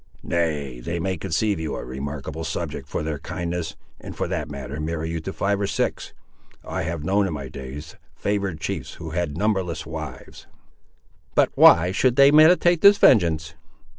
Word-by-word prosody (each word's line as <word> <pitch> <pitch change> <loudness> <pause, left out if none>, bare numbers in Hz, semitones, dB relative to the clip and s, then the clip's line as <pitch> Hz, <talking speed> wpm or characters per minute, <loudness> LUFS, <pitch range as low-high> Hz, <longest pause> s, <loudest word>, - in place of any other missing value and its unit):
"Nay, 75 -7 -2
they 85 +8 -4
may 95 +2 -1
conceive 95 +3 -1
you 80 - -3
a - - -6
remarkable 70 +4 -6
subject 80 -4 -4
for - - -3
their 75 -2 -3
kindness, 85 -1 -4 0.2
and - - -9
for - - -1
that - - -3
matter 70 +1 -6
marry 80 +1 -3
you 85 - -2
to 80 +4 -5
five 100 +1 -1
or 100 - 0
six. - - -2 0.5
I - - -3
have 80 -1 -4
known, 100 +4 +2
in 90 - -4
my 70 -3 -6
days, 70 +4 -9 0.2
favoured 100 -5 -2
chiefs - - -4
who 80 -2 -8
had 80 -2 -2
numberless 90 -6 -1
wives." 80 -5 -8 0.9
"But - - +3
why 90 +2 +6
should 120 +5 +2
they 140 +1 +7
meditate 170 +2 +5
this 200 0 +8
vengeance?" 80 - +4
80 Hz, 170 wpm, -23 LUFS, 75-95 Hz, 0.9 s, this